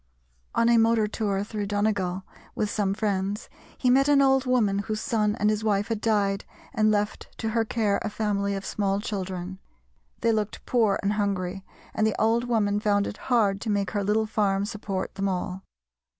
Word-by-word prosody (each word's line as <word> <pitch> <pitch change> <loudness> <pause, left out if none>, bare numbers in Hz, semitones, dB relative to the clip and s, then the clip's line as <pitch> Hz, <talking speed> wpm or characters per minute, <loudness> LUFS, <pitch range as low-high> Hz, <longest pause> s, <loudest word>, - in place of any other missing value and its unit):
On 230 - +3
a 235 0 +5
motor 225 -1 +3
tour 205 -2 -1
through 210 -1 -4
Donegal 200 -3 0 0.3
with 210 -1 -1
some 200 -2 0
friends 200 -1 -2 0.3
he 250 - +2
met 275 +2 +4
an 290 -1 +5
old 270 -1 +3
woman 215 -6 +2
whose 215 +1 -3
son 210 -2 0
and 210 -3 +2
his 215 0 -2
wife 205 0 +1
had 225 -2 -2
died 200 -3 +1 0.3
and 215 -3 +3
left 210 0 -1
to 225 - -2
her 225 +1 +1
care 215 -2 0
a - - -2
family 200 -2 -1
of 195 - -5
small 200 -1 0
children. 190 -3 -4 0.6
They 230 - +3
looked 215 -2 -2
poor 225 -5 +2
and 200 +1 +1
hungry, 195 -2 -2 0.3
and 220 - +2
the 215 - -2
old 230 +2 +2
woman 210 -4 +1
found 205 -1 +2
it - - -5
hard 205 -5 +3
to 225 - -3
make 200 -2 0
her 205 -1 -1
little 215 +2 +2
farm 200 -2 0
support 205 -3 -4
them 195 0 -1
all. 185 0 -3
210 Hz, 190 wpm, -26 LUFS, 200-220 Hz, 0.6 s, a